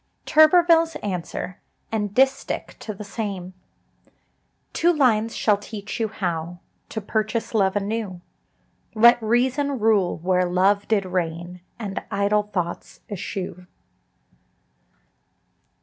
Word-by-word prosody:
George 310 0 +7
Turberville. 355 +1 +5
TURBERVILLE'S 330 -1 +3
ANSWER 180 -1 -4 0.3
AND 210 -2 -2
DISTICH 270 +1 +1
TO 215 - -6
THE 210 - -8
SAME. 195 -3 -5 1.2
Two 345 - +3
lines 230 -7 +2
shall 210 -2 +2
teach 205 +1 -7
you 225 - +1
how 175 -5 -3 0.3
To 220 - -4
purchase 220 +3 -2
love 195 -3 +2
anew: 205 -2 -2 0.8
Let 235 +2 +6
reason 260 +5 +1
rule, 210 -5 +2
where 180 +2 +1
Love 195 +3 +2
did 205 -3 +1
reign, 175 -1 -3 0.2
And 200 -4 -4
idle 210 +1 +1
thoughts 175 -3 -4
eschew. 185 -2 -5
205 Hz, 115 wpm, -23 LUFS, 185-230 Hz, 1.2 s, George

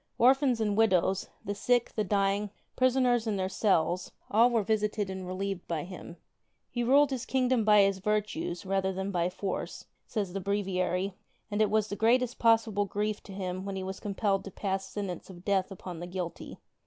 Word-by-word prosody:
Orphans 260 0 +4
and 210 -2 +1
widows, 195 -3 +2 0.2
the 205 - -2
sick, 245 +3 +1
the 215 - +1
dying, 200 +1 +1 0.3
prisoners 250 -2 +3
in 215 - 0
their 190 -1 -1
cells 185 -2 +1
— - - -25
all 230 +4 +6
were 230 -3 +1
visited 210 -1 0
and 190 -1 -6
relieved 190 0 -4
by 160 -3 -2
him. 175 -1 -9 0.6
^'He 240 - +1
ruled 275 +3 +5
his 260 -2 -2
kingdom 255 -2 +1
by 210 -1 +6
his 195 -1 +1
virtues, 210 - -2
rather 190 0 0
than 190 +1 -3
by 175 -1 +1
force," 185 +1 -4 0.2
says 200 -5 -3
the 195 - -3
Breviary, 195 -1 -1 0.4
and 205 +1 +1
it 215 - +4
was 215 0 +2
the 205 - -4
greatest 245 +3 +2
possible 225 -3 +3
grief 210 +1 -2
to 200 - -12
him 185 -1 -4
when 195 0 -4
he 190 - -3
was 190 0 -5
compelled 200 -1 0
to - - -5
pass 195 0 -3
sentence 195 -4 -5
of 180 -1 -12
death 195 -2 +1
upon 180 -3 -8
the 175 - -6
guilty. 180 -1 -6
200 Hz, 190 wpm, -29 LUFS, 190-220 Hz, 0.6 s, all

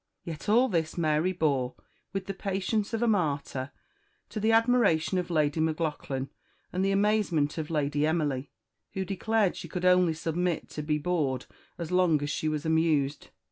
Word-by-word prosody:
Yet 165 +4 -6
all 240 +5 +5
this 165 -7 -1
Mary 155 +2 +2
bore 140 -8 0 0.4
with 195 -1 -3
the 195 - -4
patience 200 +2 -1
of 225 0 -1
a - - +3
martyr, 145 - 0 0.6
to 215 - -4
the 220 +2 +2
admiration 225 -7 +3
of 180 - -4
Lady 155 -2 +1
Maclaughlan 155 -4 -2 0.4
and 185 +1 0
the 195 - +2
amazement 195 -7 +1
of 155 - -4
Lady 150 -1 +1
Emily, 145 -4 -1 0.4
who 190 0 -2
declared 205 +1 +1
she - - -8
could 180 -1 -3
only 180 -3 +4
submit 170 +2 -2
to 150 - -5
be 150 0 0
bored 150 -5 -1 0.3
as 170 -1 -5
long 180 -4 +4
as 145 - -2
she 155 - -1
was 150 0 -3
amused. 160 -3 +1
165 Hz, 170 wpm, -28 LUFS, 150-190 Hz, 0.6 s, all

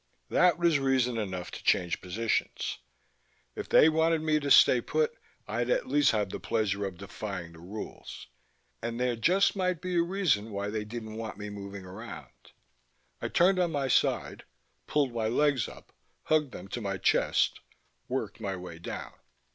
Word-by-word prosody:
That 180 -3 +4
was 170 -4 +3
reason 130 -3 +1
enough 95 -4 -4
to - - -8
change 90 -1 +2
positions. 110 +5 -2 0.8
If - - -6
they - - +7
wanted 160 0 +3
me 155 -1 +2
to 145 -1 -3
stay 125 -2 +7
put 465 - 0 0.3
I'd - - -1
at - - +2
least 145 -1 +4
have 105 -4 0
the - - -5
pleasure 100 -3 0
of 95 -3 -5
defying 100 -2 -6
the 80 - -14
rules. 100 +6 -8 0.6
And 115 0 -3
there 125 -1 +1
just 180 - +3
might 185 -3 0
be 180 0 -2
a - - +5
reason 170 - +1
why 100 0 -3
they 110 -1 -3
didn't 110 0 -7
want 110 -2 -5
me 105 0 -6
moving 100 -1 -8
around. 95 - -10 0.7
I - - -1
turned 185 +2 +3
on 175 -2 +1
my 140 -2 0
side, - - +1 0.4
pulled 140 -5 +1
my 115 -2 0
legs 135 +1 +2
up, - - -15 0.3
hugged 150 -3 +2
them 90 -3 -9
to 120 - -4
my 100 -2 -2
chest, - - +2 0.5
worked 115 -5 -3
my 100 -3 -2
way 90 -2 -8
down - - -6
115 Hz, 170 wpm, -29 LUFS, 100-155 Hz, 0.8 s, they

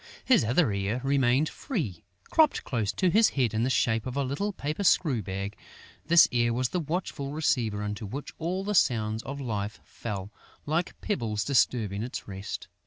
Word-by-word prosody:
His 255 - +5
other 120 - +2
ear 100 +4 -1
remained 135 +1 +3
free. 145 - -4 0.3
Cropped 315 -2 +4
close 110 -6 -1
to 185 -2 +2
his 220 +3 +5
head 125 -6 0
in 110 - 0
the 125 - +1
shape 115 -3 +1
of 130 - -5
a 140 - +2
little 145 +11 -2
paper 155 +1 -3
screw 150 - +3
bag, 100 +1 -4 0.5
this 170 0 +7
ear 120 -2 +2
was 125 +1 0
the 180 - -1
watchful 155 -3 -3
receiver 125 -9 0
into 105 +1 -4
which 135 +8 -6
all 180 +4 -2
the 210 +1 -2
sounds 110 - +2
of 140 +3 -6
life 105 -5 -3
fell, 100 -3 -6 0.3
like 160 +4 -1
pebbles 110 - -1
disturbing 115 -7 +1
its 125 +3 -5
rest. 95 +1 -6
125 Hz, 175 wpm, -28 LUFS, 110-155 Hz, 0.5 s, this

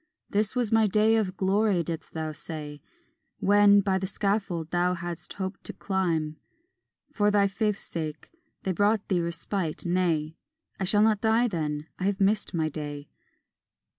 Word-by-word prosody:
"This 210 +3 +1
was 245 -4 0
my 225 -1 +4
day 215 +3 +3
of 195 -4 0
glory," 195 -1 +2
didst 165 0 -5
thou 160 -1 -2
say, 150 -1 -7 0.6
When, 205 0 +5
by 190 -1 +1
the 190 - -3
scaffold 195 -5 -1
thou 180 +1 +2
hadst 170 -1 -6
hope 190 0 -5
to - - -7
climb 165 -6 -1 0.8
For 205 -1 +3
thy 205 -1 +4
faith's 210 +1 -1
sake, 155 -2 -5 0.3
they 190 - 0
brought 205 +3 +1
thee 180 -3 +2
respite; 170 0 -3
"Nay, 170 -3 0 0.4
I 190 - 0
shall 205 +3 +3
not 215 -2 +3
die 225 +2 +3
then, 155 -6 -3
I 185 - -2
have 200 -1 0
missed 205 +1 +2
my 160 -3 0
day." 145 -1 -6
190 Hz, 160 wpm, -27 LUFS, 165-205 Hz, 0.8 s, When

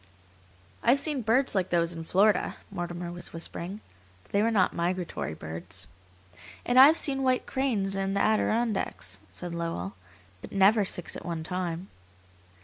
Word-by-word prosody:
"I - - +1
have 270 +3 +5
seen 290 -3 +1
birds 245 +5 +2
like 190 -2 0
those 170 -1 +1
in 165 -1 -6
Florida," 200 +4 +2 0.2
Mortimer 175 0 -4
was 175 0 -6
whispering, 170 +4 -6 0.4
"but - - -25
they 200 - +2
were 225 - +3
not 200 -5 +2
migratory 175 - -2
birds." 85 +5 -6 0.8
"And 245 +1 +4
I've 295 +5 +9
seen 270 -2 +2
white 255 -1 +1
cranes 220 -8 0
in 195 0 -1
the - - +1
Adirondacks," 215 - 0
said 175 - -6
Lowell, 165 - -3 0.5
"but - - -10
never 200 +2 +4
six 175 -2 -2
at - - -7
one 165 -2 -4
time." 180 0 -3
185 Hz, 155 wpm, -28 LUFS, 170-220 Hz, 0.8 s, I've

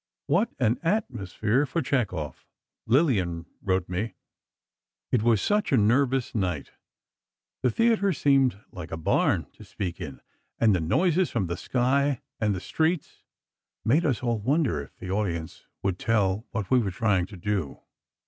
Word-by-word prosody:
What 230 - +2
an 120 -2 +1
atmosphere 130 - 0
for 165 +4 -1
Chekhov. 100 - -2 0.4
Lillian 100 - +2 0.2
wrote 95 -2 0
me: 90 +3 -3 1.0
It 125 - +3
was 115 -2 +3
such 210 0 +1
a 135 - +5
nervous 125 +4 +2
night. 90 -9 -2 0.9
The 125 - +3
theatre 220 - +2
seemed 135 - +3
like 90 -3 -8
a 80 - -3
barn 80 - +2
to - - -14
speak 90 -1 -5
in, 75 -6 -7 0.4
and 110 -3 +4
the 90 - 0
noises 175 - +2
from 110 -5 -1
the 85 0 -3
sky 130 +6 +1 0.2
and 105 -2 +1
the - - -3
streets 160 - -1 0.6
made 145 +9 +4
us 130 - 0
all 120 -2 0
wonder 130 - +1
if - - -13
the 90 - -6
audience 85 -6 -3 0.2
would 95 -2 -1
tell 105 -1 +1
what 110 -4 -4
we 130 - +6
were 105 -5 0
trying 95 -1 +1
to 100 - -11
do. 95 -5 -2
110 Hz, 155 wpm, -26 LUFS, 95-135 Hz, 1.0 s, we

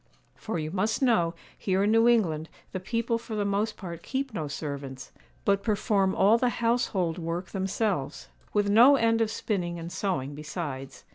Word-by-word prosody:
For 215 - -4
you 155 -1 -3
must 210 +7 0
know, 175 -10 +3 0.2
here 190 0 0
in 205 - +3
New 225 +1 +5
England 165 -10 +2 0.2
the 185 - -3
people 230 +4 -1
for 225 -1 -6
the 205 -1 0
most 205 +2 0
part 170 -4 -7
keep 265 +2 -3
no 155 -7 -3
servants, 140 -2 -6 0.3
but 200 -1 +3
perform 200 -3 +1
all 210 +4 +5
the 250 - +2
household 230 -8 0
work 170 +2 -4
themselves, 190 - -2 0.2
with 205 -1 +1
no 235 +7 +7
end 230 -2 +2
of 225 - +2
spinning 180 -6 -2
and 170 +1 -6
sewing 145 -8 -2
besides. 145 -3 -6
195 Hz, 170 wpm, -28 LUFS, 165-225 Hz, 0.3 s, no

